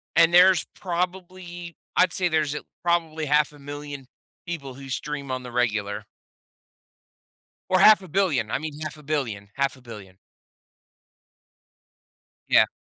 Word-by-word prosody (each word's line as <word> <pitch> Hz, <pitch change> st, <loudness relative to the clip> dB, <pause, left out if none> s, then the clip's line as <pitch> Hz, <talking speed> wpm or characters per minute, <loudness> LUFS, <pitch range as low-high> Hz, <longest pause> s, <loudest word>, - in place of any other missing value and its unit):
And 165 Hz, +1 st, +5 dB
there's 180 Hz, -1 st, +6 dB
probably 175 Hz, -1 st, -4 dB, 0.2 s
I'd 180 Hz, -1 st, +4 dB
say 185 Hz, -3 st, +1 dB
there's 155 Hz, -3 st, 0 dB
a -, -, -5 dB, 0.2 s
probably 165 Hz, -2 st, 0 dB
500,000 145 Hz, -1 st, -2 dB, 0.4 s
people 145 Hz, -6 st, -5 dB
who 135 Hz, +1 st, -11 dB
stream 140 Hz, +1 st, -4 dB
on 130 Hz, 0 st, -3 dB
the 125 Hz, -, -8 dB
regular. 110 Hz, -4 st, -1 dB, 1.7 s
Or 185 Hz, -, +4 dB
500,000,000. 185 Hz, -, +4 dB
I -, -, -1 dB
mean, 155 Hz, -1 st, -6 dB
500,000,000, 145 Hz, -10 st, -4 dB
500,000,000. 115 Hz, -9 st, -4 dB, 2.3 s
Yeah. -, -, +6 dB
150 Hz, 105 wpm, -25 LUFS, 135-175 Hz, 2.3 s, there's